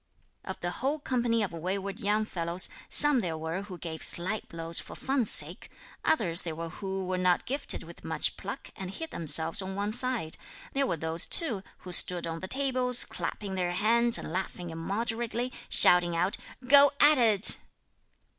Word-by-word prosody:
Of - - -8
the - - -3
whole 280 +3 -1
company 240 -5 -1
of 200 - -4
wayward 190 +4 -5
young 210 +2 0
fellows, 170 -2 -1 0.2
some 295 -3 +2
there 170 -7 -4
were 160 +4 -5
who 195 -3 -10
gave 160 -2 -7
sly 185 +5 +1
blows 165 0 0
for - - -8
fun's 265 -4 0
sake; - - +2 0.3
others 180 - +2
there 165 -2 -6
were 165 +1 -6
who 190 +2 -6
were 185 0 -3
not 180 -1 +1
gifted 280 +3 -4
with - - -14
much - - 0
pluck - - -9
and 190 -1 -7
hid 325 - -7
themselves 160 +3 0
on 190 0 -7
one 205 +1 -3
side; 245 -8 -2 0.3
there 275 0 0
were 170 - -2
those 160 +2 0
too 245 - +3 0.2
who 180 - -10
stood 175 0 +3
on 165 0 -5
the 185 - -7
tables, 255 -1 +3
clapping 200 -2 -6
their 180 -2 -2
hands 230 +5 +1
and 160 - -8
laughing 180 -2 -5
immoderately, 230 +8 -3 0.2
shouting 175 -1 +7
out: 180 +4 -1 0.3
"Go 280 +1 +6
at 295 -1 +5
it." 215 -4 +6
195 Hz, 175 wpm, -28 LUFS, 170-240 Hz, 0.3 s, shouting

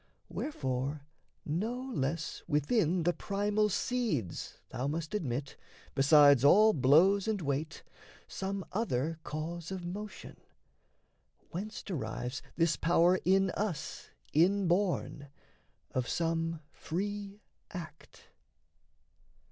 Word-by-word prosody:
Wherefore 140 - -3 0.4
no 215 +11 -1
less 155 +1 -2
within 165 - +2
the 175 +2 +2
primal 205 +2 0
seeds 205 - -2
Thou 130 +3 -3
must 155 +3 -3
admit, 140 - -3 0.4
besides 145 -1 +6
all 215 +9 +7
blows 170 - +5
and 215 -2 0
weight, 155 +1 -3 0.4
Some 195 0 -4
other 165 - -1
cause 160 +2 -5
of 190 -2 -5
motion, 205 +4 -7 1.1
whence 210 +5 -5
derives 125 - -4
This 165 -2 +2
power 175 +2 +4
in 190 +1 +4
us 200 -7 -4 0.2
inborn, 175 -3 +2 0.6
of 125 -2 -1
some 165 -1 -1
free 200 +3 -4 0.3
act. 175 -4 -10
170 Hz, 95 wpm, -32 LUFS, 145-200 Hz, 1.1 s, all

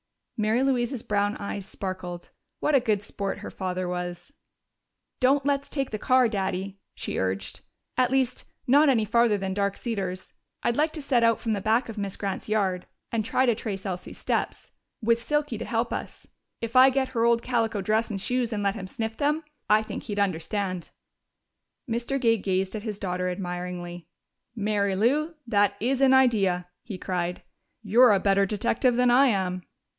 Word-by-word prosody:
Mary 220 +4 +1
Louise's 255 -2 0
brown 205 0 0
eyes 200 -1 -5
sparkled. 185 -3 -6 0.3
What 300 - +1
a 275 - +7
good 215 -5 0
sport 200 -1 -4
her 200 - -8
father 185 -1 -3
was! 180 +7 -5 0.9
"Don't 270 +2 +3
let's 280 0 0
take 275 -3 -2
the 215 - -3
car, 255 +1 +4
Daddy," 195 -2 -3 0.2
she - - -4
urged. 95 0 -2 0.4
"At 255 -1 +3
least, 265 -2 0 0.2
not 285 +4 +5
any 230 -5 +3
farther 235 -1 +3
than 190 -1 -3
Dark 200 0 0
Cedars. 195 -6 -4 0.3
I'd 235 - +1
like 305 +3 +1
to 310 - -6
set 250 -4 +2
out 230 -1 +4
from 225 -2 -1
the 200 - -2
back 225 +5 +2
of 225 -2 -6
Miss 200 -2 -3
Grant's 200 +1 -4
yard 190 -4 0 0.2
and 225 -2 0
try 255 +3 +2
to 240 - +4
trace 200 -2 -5
Elsie's 180 -2 -5
steps - - -2 0.3
with 230 +1 +3
Silky 295 -3 -1
to 230 - -4
help 230 +1 -1
us. - - -6 0.4
If 230 +1 -4
I 260 +1 +9
get 265 0 0
her 235 -3 0
old 235 0 +3
calico 225 -4 0
dress 215 +3 +1
and 200 -3 -3
shoes 245 +3 -1
and 205 -2 -2
let 200 -1 +2
him 195 -3 -6
sniff 225 +2 -4
them, 300 +2 +1 0.3
I 215 +1 +5
think - - -6
he'd 205 -3 -5
understand." 185 -1 -1 1.0
Mr. 240 +4 -1
Gay 230 -3 +3
gazed 190 +1 -1
at 215 - -4
his 210 -2 -4
daughter 180 -2 -2
admiringly. 180 -1 -5 0.5
"Mary 205 -2 0
Lou, 295 - +1
that 205 -3 +2
is 255 +4 0
an 265 -1 +6
idea!" 195 -9 +3
he 215 -6 -7
cried. 180 -1 -3 0.4
"You're 225 +3 +6
a 195 - +3
better 195 0 +3
detective 235 +4 +1
than 250 0 +4
I 270 +3 +6
am." 185 -5 0
215 Hz, 180 wpm, -26 LUFS, 190-245 Hz, 1.0 s, I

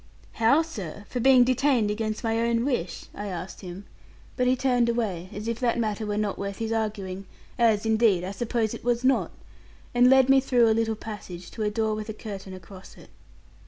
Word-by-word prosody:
'How, 240 +8 +3
sir? 205 - -8
For 250 - -3
being 255 0 +6
detained 255 -3 +2
against 215 +1 -3
my 225 0 0
own 235 +1 +1
wish?' 245 -11 -2
I 205 - -6
asked 180 -1 -6
him; 185 +1 -8 0.5
but 250 -1 +1
he 255 - +4
turned 245 -2 +2
away, 200 -7 -2
as 210 +2 -6
if 230 0 -2
that 240 -2 +1
matter 215 -2 -2
were 205 0 -2
not 210 -2 -2
worth 200 0 -4
his 225 0 -3
arguing, 200 -4 -3 0.3
as, 225 -3 +3
indeed, 220 -5 +3
I 185 - -4
suppose 225 +1 -1
it - - -8
was 240 0 0
not, 265 +1 +2 0.6
and 245 +1 +5
led 265 -1 +6
me 270 0 +6
through 250 -3 +3
a 220 - +4
little 225 0 0
passage 190 -5 -8
to 225 - -7
a 210 - +1
door 220 +1 0
with 215 +1 -5
a - - -3
curtain 195 -4 -8
across 185 +1 -13
it. - - -16
220 Hz, 205 wpm, -26 LUFS, 205-240 Hz, 0.6 s, being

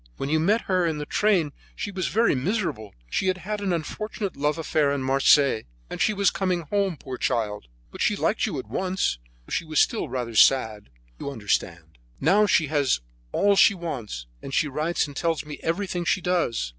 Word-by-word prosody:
When 135 - -3
you 155 +1 +2
met 205 +8 +2
her 185 -2 +1
in 160 -2 0
the 150 - -4
train 185 -5 +2 0.2
she 205 - -4
was 185 -2 -2
very 230 +3 +2
miserable; 135 - -2
she 190 - -1
had 185 0 +1
had 205 +3 -4
an 195 -2 -1
unfortunate 195 +5 -3
love 150 +3 0
affair 155 -3 +1
in 140 -2 -1
Marseilles, 135 -2 +4 0.3
and - - -4
she - - +4
was 200 -1 +2
coming 185 -3 -1
home, 195 +1 -1
poor 130 -1 -7
child. 105 - -1 0.2
But - - -8
she - - +2
liked - - 0
you - - -3
at - - -5
once, 180 - -1 0.3
though - - -16
she - - 0
was 155 -1 0
still 230 - +1
rather 125 -3 -3
sad, 110 -4 +3 0.3
you - - -4
understand. 85 - -3 0.2
Now 200 +8 +4
she 165 -4 +3
has 145 - +1 0.3
all 200 0 +3
she 200 +1 +6
wants, 125 - -5 0.2
and 135 - -5
she 155 - +2
writes 155 +5 0
and 145 -2 -10
tells 165 0 -1
me 150 -1 -8
everything 180 +1 -2
that 175 - -5
she 190 - +1
does. 170 - 0
160 Hz, 205 wpm, -25 LUFS, 135-190 Hz, 0.3 s, she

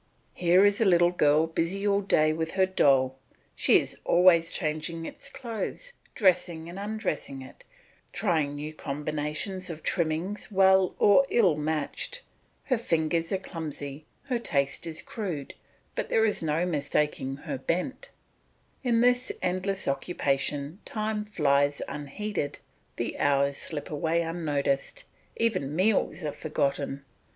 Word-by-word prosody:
Here 180 +3 +4
is 205 +2 +3
a - - +4
little 175 -2 +5
girl 155 -2 +4
busy 170 +5 -2
all 200 0 +3
day 155 -5 +3
with 160 0 -2
her 190 -1 +4
doll; 135 -7 +3 0.4
she - - +5
is - - -5
always 170 -1 +5
changing 160 +1 -2
its - - -7
clothes, 245 - -5 0.2
dressing 175 -5 +2
and 175 +3 -7
undressing 200 - -3
it, 130 - -14 0.5
trying 150 -4 0
new 150 +2 -5
combinations 150 +6 -3
of 160 -2 -7
trimmings 170 +6 -1
well 190 -1 +4
or 205 +7 +6
ill 190 -10 +4
matched; 155 - -3 0.4
her 255 -4 0
fingers 165 -4 0
are 195 - +2
clumsy, 155 -5 -7 0.2
her 255 -4 -1
taste 140 -6 -1
is 160 -1 -6
crude, 175 - -5 0.4
but - - -3
there 225 - +3
is 210 - +1
no 160 +2 0
mistaking 145 -4 -1
her 140 - -5
bent; 185 - -2 0.7
in 235 -3 +3
this 245 +1 +3
endless 185 +2 -2
occupation 140 +2 -1
time 215 -1 -2
flies 145 -8 +2
unheeded, 150 +2 -4 0.4
the - - -3
hours 140 0 +2
slip 150 +1 -6
away 160 +3 0
unnoticed, 160 - -2 0.3
even 185 -11 0
meals 190 -1 +2
are 150 - -1
forgotten. 140 -2 -2
165 Hz, 135 wpm, -28 LUFS, 150-195 Hz, 0.7 s, or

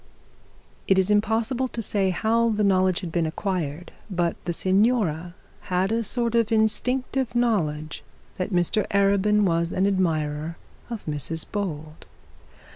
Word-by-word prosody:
It 195 - +4
is 190 +2 +3
impossible 225 +5 +1
to 235 - -6
say 200 -3 0
how 230 +5 +1
the 215 -1 0
knowledge 185 -2 +2
had 175 -3 -6
been 165 -1 0
acquired, 170 -2 -3 0.2
but 175 -3 0
the 175 - -1
signora 185 -3 +1 0.3
had 185 +2 +1
a 230 +1 0
sort 235 +1 +2
of 230 -1 +2
instinctive 250 +3 +1
knowledge 155 -11 -1 0.3
that 185 - -2
Mr 180 +2 +1
Arabin 200 +1 +2
was 170 -2 +1
an 190 - +1
admirer 160 -4 -1 0.3
of 230 -3 -6
Mrs 155 +2 -3
Bold. 155 -6 -5
195 Hz, 135 wpm, -24 LUFS, 170-220 Hz, 0.3 s, It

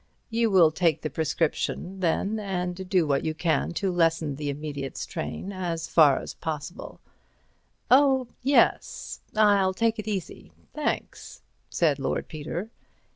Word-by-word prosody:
You 230 0 +2
will 175 -6 +6
take 165 -2 +1
the 155 - -3
prescription, 165 +4 -1
then, 195 +5 0
and 185 -2 -3
do 185 -4 +3
what 140 -2 +1
you 160 -1 -2
can 165 +1 0
to 190 +2 -1
lessen 165 -4 +1
the 145 -1 -3
immediate 140 -1 -5
strain 185 +3 -5
as 170 -3 -3
far 150 -6 +5
as - - -6
possible." 160 +2 -6 0.9
"Oh, 265 -1 +5
yes—I'll 210 -6 +2
take 230 +1 +1
it 215 - -5
easy, 200 -4 -5 0.2
thanks," 300 -1 -4 0.3
said 150 -5 +1
Lord 135 - -2
Peter. 160 +7 -5
175 Hz, 130 wpm, -26 LUFS, 155-200 Hz, 0.9 s, will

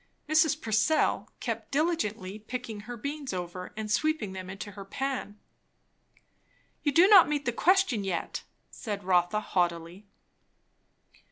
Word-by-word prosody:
Mrs. 310 -1 +3
Purcell 220 +7 +1
kept - - -4
diligently 225 - -1
picking 230 -1 -6
her 240 +3 -8
beans 280 0 -5
over 180 0 -5
and 215 -1 -4
sweeping 275 -5 0
them 185 -1 -7
into 195 +2 -7
her 195 0 -9
pan. 245 -1 -4 1.4
"You 290 - +1
do 340 +6 +6
not 390 -7 +8
meet 290 -2 -1
the 240 - 0
question 350 - +3
yet," 185 -3 -3 0.3
said 205 -4 -5
Rotha 180 +1 +2
haughtily. 175 -1 -2
215 Hz, 125 wpm, -29 LUFS, 190-290 Hz, 1.4 s, not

